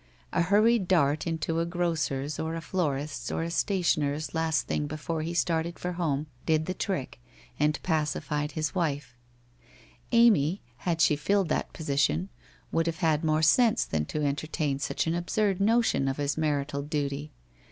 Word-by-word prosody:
A 175 - +2
hur 200 +5 +4
ried 230 -4 +3
dart 155 -4 +2
into 165 0 -1
a 165 - +1
grocers' 155 -5 -1
or 160 +1 -2
a - - -3
florists' 150 -4 -2
or - - -1
a 170 - -3
stationers' 155 -6 0
last 160 -6 +1
thing 150 - -1
before 155 +2 -3
he 170 +2 -3
started 170 0 0
for 180 - -3
home 155 -5 -1 0.2
did 155 0 +2
the 185 - -2
trick, 180 -10 -3 0.4
and 150 +1 +2
pacified 150 -2 -1
his 155 -1 -2
wife. 145 -8 -2 1.0
Amy, 205 - +4
had 165 +4 -1
she 150 - +5
filled 195 +4 +1
that - - -1
position, 155 +4 0 0.4
would 165 0 +1
have 165 -1 -1
had 155 -1 +2
more 155 0 +2
sense 235 +7 +4
than 75 -1 -1
to 150 - -3
entertain 145 0 -1
such 145 - -1
an 165 - 0
absurd 195 +3 0
notion 225 -9 +3
of 135 - -1
his 145 -1 -1
marital 145 -2 -1
duty. 145 0 -3
160 Hz, 165 wpm, -28 LUFS, 145-175 Hz, 1.0 s, she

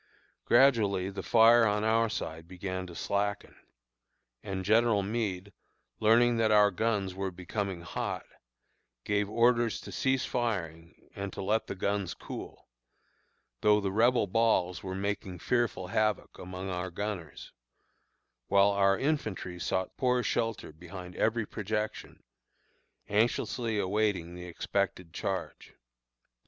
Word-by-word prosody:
Gradually 110 -7 +4
the 100 - -5
fire 115 +1 +6
on 105 0 0
our 115 +1 +3
side 80 -5 -5
began 95 0 -5
to 85 - -10
slacken, 100 +2 -2 0.9
and 95 -1 -4
General 110 -1 +3
Meade, 100 -2 -3 0.5
learning 115 +2 +4
that 110 -1 +3
our 105 -1 +5
guns 100 -1 -1
were 95 +1 -3
becoming 95 0 -4
hot, 85 - -4 0.8
gave 105 -1 0
orders 115 -1 +2
to - - -9
cease 130 -2 +1
firing 85 -9 -3
and 100 0 -4
to - - -5
let 110 +3 0
the - - -4
guns 100 -1 -1
cool, - - -9 0.9
though 105 0 +5
the 100 -2 -2
Rebel 120 +3 +3
balls 95 -4 +1
were 95 -1 -5
making 95 -2 -3
fearful 110 -1 0
havoc 110 0 0
among 95 +1 -6
our 90 +1 -3
gunners, 90 -4 -6 1.0
while 100 +1 +5
our 100 -1 +3
infantry 110 - -2
sought 95 +1 -2
poor 125 -1 +2
shelter 115 -8 -1
behind 90 +2 -10
every 115 0 +1
projection, 105 +1 -4 0.8
anxiously 115 +1 0
awaiting 100 -3 0
the 90 0 -8
expected 90 -1 -2
charge. - - -4
100 Hz, 125 wpm, -30 LUFS, 95-110 Hz, 1.0 s, fire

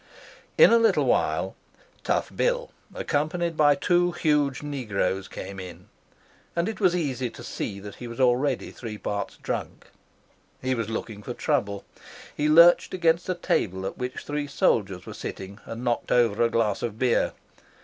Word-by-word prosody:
In - - +8
a 230 - +6
little 230 - +3
while - - +1 0.5
Tough - - -1
Bill, - - 0 0.2
accompanied 165 +3 -1
by 145 -2 +5
two 175 +4 +2
huge 150 -5 +1
negroes, 105 -9 -2
came 100 -1 -7
in, 90 -1 -10 0.7
and 170 +1 +1
it 220 - -4
was 185 -4 +3
easy 130 -7 -1
to - - -12
see 100 -2 -4
that 100 0 -10
he 120 - -7
was 115 +2 -8
already 130 +1 +2
three 110 -3 -7
parts 100 0 -4
drunk. - - -5 0.7
He 130 0 -1
was 115 -3 -2
looking 110 -2 -5
for 120 +3 -6
trouble. 100 -10 -1 0.5
He 150 +1 +1
lurched 170 +4 +6
against 170 0 +2
a 185 - +1
table 95 - -1
at 95 - -5
which 125 0 -4
three 145 0 -3
soldiers 95 -9 +1
were - - -8
sitting 100 +2 -7
and 115 +2 -7
knocked 120 -1 -1
over 120 -3 +3
a 115 - +4
glass 110 -4 0
of 110 -2 -3
beer. 125 -1 +2
125 Hz, 165 wpm, -26 LUFS, 105-155 Hz, 0.7 s, In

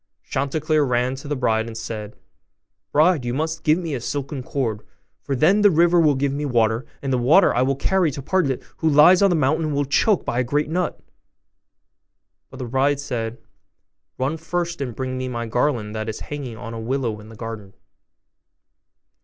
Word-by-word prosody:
Chanticleer 150 +3 0
ran 125 -1 +1
to 140 - -9
the 145 - -1
bride, 115 -3 0
and 115 -1 -7
said, 110 -2 -6 0.8
'Bride, 155 -1 +3
you 120 0 -2
must 160 +2 -2
give 155 +1 +4
me 170 -4 -4
a 130 - -3
silken 140 +2 -4
cord, 120 -5 -2 0.4
for 140 - -2
then 180 +10 +4
the 205 - +7
river 170 0 +4
will 150 -4 +4
give 135 +1 0
me 145 +1 -3
water, 120 -1 +1 0.2
and 135 -1 -1
the 125 - +2
water 155 +10 +5
I 120 - +1
will 135 +1 +2
carry 180 +4 +1
to 140 0 -6
Partlet, 140 -6 0
who 160 - +1
lies 155 +6 +6
on 200 - +5
the 175 - +2
mountain, 155 +2 +1
and 150 -2 -2
will 145 - +1
be 140 - -9
choked 210 +5 +3
by 120 - -1
a - - +2
great 145 +5 -1
nut.' 180 0 -1 1.5
But 130 - -12
the 130 - -5
bride 135 +3 +1
said, 120 -4 -4 0.8
'Run 135 +5 -1
first, 170 0 -3
and 125 -5 -4
bring 130 -1 -3
me 130 - -3
my 120 -2 -3
garland 115 -2 -1
that 110 0 -4
is 110 - -6
hanging 135 -6 -6
on 115 0 -7
a 115 - -5
willow 115 -2 -2
in 105 +1 -13
the 115 - -12
garden. 110 -3 -8
135 Hz, 200 wpm, -22 LUFS, 120-155 Hz, 1.5 s, the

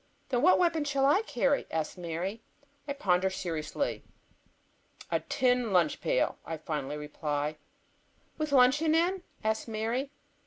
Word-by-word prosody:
"Then 245 -2 +1
what 365 +5 +6
weapon 335 -3 +2
shall 275 -2 +1
I 295 +9 +5
carry?" 275 - 0
asks 160 -1 -2
Mary. 180 +5 -4 0.5
I 280 - -1
ponder 190 -8 +2
seriously. 175 - -3 1.1
"A - - +2
tin 250 -3 +1
lunch 175 -5 +2
pail," - - +1
I 160 - -5
finally 150 -2 -4
reply. 150 0 -3 0.8
"With 305 -2 -3
luncheon 285 +4 +5
in?" 355 +3 +2 0.2
asks 220 +1 0
Mary. 230 +5 -2
230 Hz, 130 wpm, -30 LUFS, -, 1.1 s, what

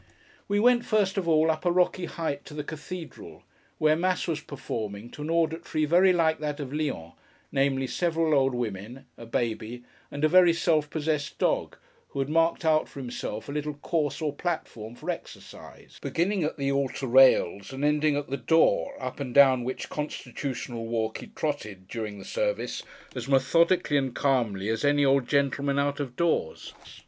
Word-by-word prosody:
We 205 0 +1
went, 240 +1 +4
first 210 -5 +1
of 180 - -4
all, 160 0 +4
up 155 0 -4
a 175 - +2
rocky 180 0 +2
height, 160 -5 -4
to 150 - -10
the 150 - -3
cathedral: 165 +3 -8 0.3
where 155 0 +3
Mass 180 +2 0
was 155 -3 -2
performing 115 -6 -6
to - - -10
an 150 - -4
auditory 165 -1 0
very 180 +5 +5
like 160 -3 +2
that 150 -1 -3
of 140 -2 -5
Lyons, 140 - -3 0.4
namely, 135 -1 +1
several 165 +2 0
old 135 -2 +3
women, 120 +3 -5
a 115 - -11
baby, 115 +1 -3 0.3
and 145 - -6
a - - +6
very 175 +1 +6
self 155 -3 +1
possessed 150 -2 -2
dog, - - 0 0.3
who - - -11
had 135 +1 -1
marked 165 +1 +2
out 155 -1 +3
for - - -10
himself 120 -4 -5
a - - -5
little 150 0 -3
course 150 +1 -2
or 150 -2 -1
platform 120 -9 -4
for - - -3
exercise, - - -11
beginning 185 +2 0
at 155 - -2
the 140 -1 0
altar 140 -1 -1
rails 125 -6 +4
and 135 +2 -2
ending 150 0 +2
at 145 - -3
the 140 - -3
door, 160 +6 +2
up 130 0 -5
and 130 -3 -5
down 135 -3 +6
which 130 +2 -4
constitutional 125 -5 -5
walk 110 -1 -2
he - - -9
trotted, 110 -12 -4
during 105 -1 -5
the - - -10
service, - - -2 0.3
as 125 -1 -5
methodically 145 +4 +3
and 135 -3 -1
calmly, 115 -8 0
as 110 0 -1
any 145 0 +3
old 135 -2 +3
gentleman 140 0 +1
out 140 0 0
of 130 -4 -4
doors. 170 - -1
145 Hz, 180 wpm, -27 LUFS, 130-160 Hz, 0.4 s, a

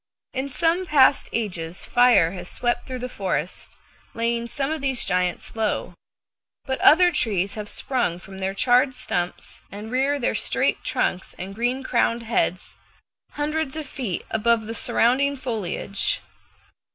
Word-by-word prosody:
In 265 +1 -2
some 335 +6 +1
past 280 -3 +5
ages 180 -6 -3
fire 245 -9 +5
has 185 - -7
swept 240 -1 -1
through 260 -1 -4
the 250 0 -4
forest, 185 - -3 0.4
laying 235 0 0
some 275 +3 -2
of 315 -2 -2
these 265 -3 -1
giants 180 +2 -1
low, 220 -1 -1 0.7
but 265 -1 -2
other 355 +3 +7
trees 200 - 0
have 210 -1 -5
sprung 245 -10 -1
from 190 +2 -11
their 190 0 -2
charred 255 +4 +3
stumps, 175 -6 -3
and 210 +3 -7
rear 270 +3 +2
their 255 - 0
straight - - 0
trunks 185 - -1
and 190 +2 -6
green 245 +5 -1
crowned 235 -2 +1
heads 210 -5 -1 0.6
hundreds 300 -1 -2
of 315 -1 -4
feet 250 -9 -4
above 225 0 +2
the 225 - -5
surrounding 265 +5 +2
foliage. 210 -6 -2
235 Hz, 145 wpm, -24 LUFS, 195-265 Hz, 0.7 s, other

